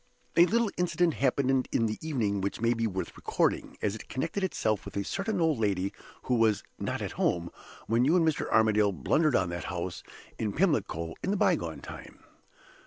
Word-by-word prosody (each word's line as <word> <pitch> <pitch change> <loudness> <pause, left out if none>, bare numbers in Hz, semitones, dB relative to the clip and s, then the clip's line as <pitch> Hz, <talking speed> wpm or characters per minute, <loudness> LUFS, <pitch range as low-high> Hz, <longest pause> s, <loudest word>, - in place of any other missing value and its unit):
A 175 +1 +7
little 230 -1 +2
incident 175 -1 +2
happened 135 -1 +1
in 115 - +2
the 110 -1 -2
evening 115 -11 -1
which 100 - -2
may 115 +1 +2
be 115 -1 0
worth 95 -3 -4
recording, - - -1
as 105 - +1
it 110 - -9
connected 165 +9 -2
itself 110 - 0
with - - -7
a 100 - 0
certain 195 - -2
old 160 -6 +2
lady 100 -3 0 0.3
who 125 - -1
was 115 -3 +3 0.2
not - - -2
'at - - -3
home' 85 0 0 0.3
when 115 +2 +2
you 150 +7 +4
and 165 -3 +4
Mr. 155 - 0
Armadale 110 -2 +4
blundered 150 - +2
on 90 -2 +2
that 85 0 -4
house 90 0 -4 0.4
in 105 -2 -1
Pimlico 145 - 0
in - - -2
the 205 - +1
bygone - - +1
time. - - -10
115 Hz, 190 wpm, -29 LUFS, 100-160 Hz, 0.4 s, A